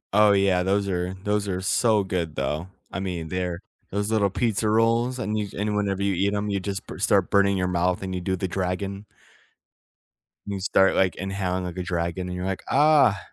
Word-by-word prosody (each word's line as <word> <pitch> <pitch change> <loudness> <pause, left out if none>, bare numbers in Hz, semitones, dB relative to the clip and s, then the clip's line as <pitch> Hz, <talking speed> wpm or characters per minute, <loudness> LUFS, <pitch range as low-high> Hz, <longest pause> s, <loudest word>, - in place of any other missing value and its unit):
Oh 105 -1 +6
yeah, 95 -2 +3
those 100 +2 +1
are 90 +1 -2
those 105 0 0
are 90 -1 -2
so 105 +2 +2
good 85 -5 -3
though. 75 +6 -2 0.2
I - - -4
mean, 85 -4 -4
they're 90 0 -3 0.3
those 105 +2 -2
little 105 -3 +2
pizza 110 +1 0
rolls, 115 +3 +2
and 110 -3 -2
you 105 -1 -2
c - - -11
and 105 0 -1
whenever 100 -1 0
you 100 -1 +1
eat 100 +3 +1
'em, 105 0 -2
you 100 - 0
just 95 0 -4
b - - -9
start 100 -2 +2
burning 100 -1 +4
your 90 0 0
mouth 90 +1 0
and 95 0 -4
you 90 - -3
do 95 +1 -1
the 95 +1 -3
dragon 95 +2 -3 1.4
you 100 -1 -4
start, 95 0 +3
like, 95 -1 +2
inhaling 95 -1 -2
like 90 0 -6
a 90 - -2
dragon, 85 +1 -2
and 90 - -5
you're 90 +1 -4
like, 95 -1 -3
"Ah," 145 -9 +5
95 Hz, 210 wpm, -25 LUFS, 90-105 Hz, 1.4 s, Oh